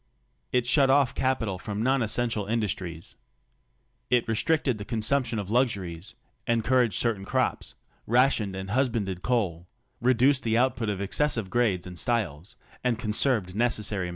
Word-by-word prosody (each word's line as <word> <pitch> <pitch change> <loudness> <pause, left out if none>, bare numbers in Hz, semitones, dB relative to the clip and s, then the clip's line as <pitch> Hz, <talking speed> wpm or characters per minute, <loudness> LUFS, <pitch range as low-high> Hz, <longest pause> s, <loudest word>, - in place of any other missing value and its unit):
It 125 -1 +1
shut 135 +2 +4
off 135 -1 +4
capital 115 -8 -1
from 105 +2 -4
non 135 +1 +2
essential 110 -2 -1
industries. 95 -7 -3 0.9
It 125 -2 +2
restricted 130 +1 +1
the - - -5
con 110 +1 -3
sumption 120 0 0
of 100 0 -5
luxuries, 100 -9 -1 0.3
encouraged 120 0 +2
certain 115 -5 0
crops, - - -1 0.3
rationed 120 -5 +2
and 95 +1 -6
husbanded 110 -7 0
coal, 90 -9 -1 0.3
reduced 130 +3 +3
the 115 -1 +1
output 120 -3 +1
of 100 -1 -2
excessive 115 -1 0
grades 105 -7 +1
and 90 -2 -8
styles, 105 - -2 0.3
and 125 -2 +1
conserved 110 -3 0
necessary 105 -4 0
materials. - - -4
115 Hz, 145 wpm, -27 LUFS, 100-125 Hz, 0.9 s, shut